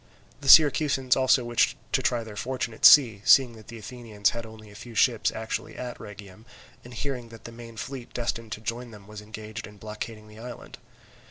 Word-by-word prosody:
The 140 Hz, -1 st, -3 dB
Syracusans 140 Hz, -4 st, +5 dB
also 130 Hz, -1 st, +3 dB
wished 120 Hz, 0 st, +1 dB
to -, -, +1 dB
try 120 Hz, -1 st, 0 dB
their 110 Hz, -2 st, -10 dB
fortune 125 Hz, 0 st, -4 dB
at -, -, -1 dB
sea, 115 Hz, -9 st, +7 dB
seeing 130 Hz, 0 st, +5 dB
that 110 Hz, -2 st, -15 dB
the 115 Hz, -, -10 dB
Athenians 110 Hz, -2 st, -2 dB
had 115 Hz, -1 st, -6 dB
only 110 Hz, -1 st, -14 dB
a -, -, -15 dB
few 115 Hz, +3 st, -11 dB
ships 115 Hz, 0 st, +2 dB
actually 110 Hz, 0 st, -5 dB
at 125 Hz, -1 st, -7 dB
Rhegium, 105 Hz, 0 st, -12 dB, 0.4 s
and 120 Hz, 0 st, -12 dB
hearing 125 Hz, -3 st, -5 dB
that 115 Hz, -1 st, -14 dB
the 115 Hz, -, -9 dB
main 115 Hz, -1 st, -12 dB
fleet 130 Hz, +1 st, -7 dB
destined 115 Hz, -2 st, -4 dB
to 110 Hz, -, -8 dB
join 120 Hz, +2 st, -5 dB
them 105 Hz, -3 st, -14 dB
was 105 Hz, 0 st, -10 dB
engaged 110 Hz, +1 st, -9 dB
in 105 Hz, 0 st, -15 dB
blockading 105 Hz, +1 st, -8 dB
the 105 Hz, +1 st, -14 dB
island. 120 Hz, 0 st, -10 dB
115 Hz, 200 wpm, -26 LUFS, 110-125 Hz, 0.4 s, sea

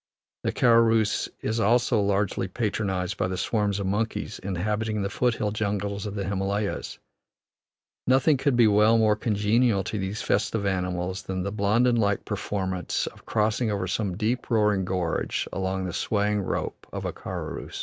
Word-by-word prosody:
The -, -, 0 dB
karorus 115 Hz, -2 st, +3 dB
is 110 Hz, +1 st, -1 dB
also 120 Hz, 0 st, +3 dB
largely 100 Hz, -1 st, 0 dB
patronized 100 Hz, -3 st, -2 dB
by -, -, 0 dB
the 95 Hz, 0 st, -3 dB
swarms 105 Hz, -2 st, 0 dB
of 100 Hz, -, -2 dB
monkeys 105 Hz, +2 st, -2 dB
inhabitating 105 Hz, +3 st, -2 dB
the 100 Hz, -, -2 dB
foot 125 Hz, +1 st, +1 dB
hill 105 Hz, -2 st, -1 dB
jungles 100 Hz, -1 st, -2 dB
of 100 Hz, -, -5 dB
the 100 Hz, -, -2 dB
Himalayas; 100 Hz, +1 st, -2 dB, 1.1 s
nothing 135 Hz, +3 st, +4 dB
could 135 Hz, 0 st, +1 dB
well 110 Hz, 0 st, +5 dB
be -, -, +3 dB
more 105 Hz, -1 st, +4 dB
congenial 105 Hz, 0 st, +2 dB
to 105 Hz, -, -3 dB
these 95 Hz, +3 st, -3 dB
festive 105 Hz, 0 st, 0 dB
animals 90 Hz, -1 st, -1 dB
than 95 Hz, -1 st, -3 dB
the 100 Hz, -, -2 dB
Blondin 110 Hz, +4 st, +2 dB
like 100 Hz, -3 st, +1 dB
performance 95 Hz, -3 st, -2 dB
of -, -, -10 dB
crossing 110 Hz, +2 st, +1 dB
over 100 Hz, -3 st, -1 dB
some 90 Hz, 0 st, -2 dB
deep, 115 Hz, +3 st, -1 dB
roaring 105 Hz, -4 st, +2 dB
gorge 90 Hz, -3 st, -1 dB
along 95 Hz, 0 st, -2 dB
the 90 Hz, -, -4 dB
swaying 105 Hz, +2 st, 0 dB
rope 95 Hz, -, -4 dB
of -, -, -5 dB
a -, -, -2 dB
karorus. -, -, -6 dB
105 Hz, 160 wpm, -26 LUFS, 95-110 Hz, 1.1 s, well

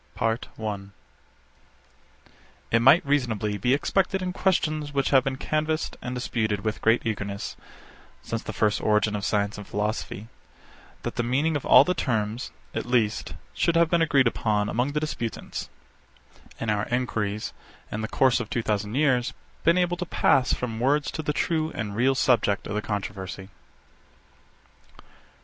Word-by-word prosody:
PART 115 Hz, +1 st, -1 dB
I. 110 Hz, -1 st, -2 dB
62. 100 Hz, -1 st, -8 dB, 1.8 s
It 115 Hz, -, +5 dB
might 135 Hz, +8 st, +6 dB
reasonably 110 Hz, -7 st, 0 dB
be 125 Hz, +7 st, +3 dB
expected 195 Hz, +6 st, +1 dB
in 180 Hz, 0 st, -2 dB
questions 155 Hz, -6 st, 0 dB
which 140 Hz, -1 st, +1 dB
have 135 Hz, -2 st, +6 dB
been 135 Hz, -1 st, -1 dB
canvassed 155 Hz, +3 st, -1 dB
and 125 Hz, +1 st, -4 dB
disputed 110 Hz, -4 st, -1 dB
with 110 Hz, 0 st, -3 dB
great 115 Hz, +1 st, +3 dB
eagerness, 100 Hz, -2 st, -3 dB, 0.7 s
since 115 Hz, 0 st, -3 dB
the -, -, -6 dB
first 105 Hz, -1 st, +1 dB
origin 105 Hz, 0 st, +2 dB
of 100 Hz, -, -4 dB
science 105 Hz, 0 st, 0 dB
and 105 Hz, -, -9 dB
philosophy, 105 Hz, 0 st, -3 dB, 0.8 s
that -, -, -4 dB
the -, -, +2 dB
meaning 140 Hz, +7 st, +1 dB
of 145 Hz, -, -3 dB
all -, -, +9 dB
the 180 Hz, -, 0 dB
terms, 115 Hz, -5 st, -1 dB, 0.2 s
at -, -, -3 dB
least, 115 Hz, -4 st, 0 dB, 0.2 s
should 170 Hz, -, +1 dB
have 170 Hz, -1 st, +4 dB
been 170 Hz, -1 st, +3 dB
agreed 145 Hz, -5 st, +4 dB
upon 105 Hz, -3 st, +1 dB
among 125 Hz, +5 st, 0 dB
the 150 Hz, -, +1 dB
disputants; 120 Hz, -7 st, -4 dB, 0.9 s
and 115 Hz, -, -1 dB
our 105 Hz, 0 st, 0 dB
enquiries, 110 Hz, -4 st, -2 dB, 0.4 s
in 105 Hz, -, -3 dB
the 110 Hz, -, -2 dB
course 130 Hz, +2 st, +3 dB
of 125 Hz, -, -5 dB
two 120 Hz, -, -1 dB
thousand 105 Hz, +1 st, -1 dB
years, 130 Hz, -4 st, +2 dB, 0.3 s
been 170 Hz, +2 st, +4 dB
able 175 Hz, -1 st, +1 dB
to 180 Hz, -, -3 dB
pass 130 Hz, -5 st, +3 dB
from 115 Hz, -3 st, -2 dB
words 140 Hz, +4 st, +2 dB
to 160 Hz, -, -4 dB
the 150 Hz, -, -1 dB
true 160 Hz, +1 st, 0 dB
and 105 Hz, -2 st, -4 dB
real 130 Hz, +4 st, +3 dB
subject 110 Hz, -6 st, +2 dB
of 100 Hz, -, -4 dB
the 105 Hz, -, -1 dB
controversy. 95 Hz, -2 st, -5 dB
120 Hz, 165 wpm, -26 LUFS, 105-145 Hz, 1.8 s, all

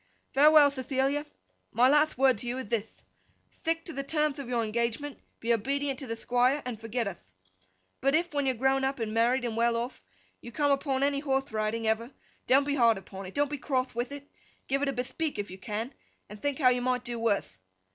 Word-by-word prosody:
Farewell, 295 Hz, +1 st, +7 dB
Thethilia! 275 Hz, +2 st, -1 dB, 0.4 s
My 245 Hz, +2 st, +4 dB
latht 295 Hz, +2 st, +3 dB
wordth 260 Hz, -3 st, +4 dB
to 240 Hz, -, -7 dB
you 245 Hz, +2 st, -2 dB
ith 245 Hz, -6 st, -6 dB
thith, 225 Hz, -2 st, -3 dB, 0.5 s
Thtick 330 Hz, 0 st, -2 dB
to 330 Hz, -, -7 dB
the 275 Hz, -, -2 dB
termth 300 Hz, 0 st, 0 dB
of 270 Hz, -3 st, -6 dB
your 240 Hz, -2 st, +1 dB
engagement, 235 Hz, +6 st, -2 dB, 0.2 s
be 235 Hz, +1 st, +1 dB
obedient 275 Hz, +4 st, -1 dB
to 270 Hz, -, -6 dB
the 230 Hz, -, -3 dB
Thquire, 250 Hz, +5 st, +1 dB
and 235 Hz, -4 st, -5 dB
forget 225 Hz, 0 st, -2 dB
uth. 170 Hz, -, -8 dB, 0.7 s
But 275 Hz, +3 st, +2 dB
if, 345 Hz, 0 st, 0 dB
when 285 Hz, -2 st, 0 dB
you're 260 Hz, -, +2 dB
grown 265 Hz, +2 st, +2 dB
up 270 Hz, +1 st, 0 dB
and 220 Hz, -2 st, -2 dB
married 240 Hz, +3 st, +2 dB
and 230 Hz, -2 st, -2 dB
well 235 Hz, 0 st, +2 dB
off, 240 Hz, +2 st, -4 dB, 0.4 s
you 240 Hz, -, -9 dB
come 290 Hz, +2 st, +1 dB
upon 275 Hz, -1 st, +1 dB
any 280 Hz, 0 st, +1 dB
horthe 270 Hz, -3 st, -1 dB
riding 215 Hz, +1 st, -1 dB
ever, 220 Hz, +2 st, 0 dB, 0.4 s
don't 270 Hz, +2 st, +5 dB
be 285 Hz, -, 0 dB
hard 235 Hz, -5 st, +4 dB
upon 195 Hz, 0 st, -9 dB
it, 185 Hz, -, -11 dB
don't 290 Hz, 0 st, +2 dB
be 295 Hz, -, -3 dB
croth 255 Hz, 0 st, -1 dB
with 240 Hz, +3 st, -3 dB
it, 285 Hz, 0 st, -8 dB, 0.4 s
give 275 Hz, +1 st, 0 dB
it 285 Hz, -, +1 dB
a -, -, -1 dB
Bethpeak 265 Hz, +4 st, -3 dB
if 205 Hz, -3 st, -4 dB
you 190 Hz, -, -9 dB
can, 220 Hz, +6 st, -4 dB, 0.3 s
and 210 Hz, 0 st, -11 dB
think 285 Hz, -1 st, -1 dB
you 250 Hz, -3 st, +4 dB
might 250 Hz, 0 st, 0 dB
do 240 Hz, -1 st, -4 dB
wurth. 200 Hz, -, -1 dB
255 Hz, 215 wpm, -29 LUFS, 230-280 Hz, 0.7 s, Farewell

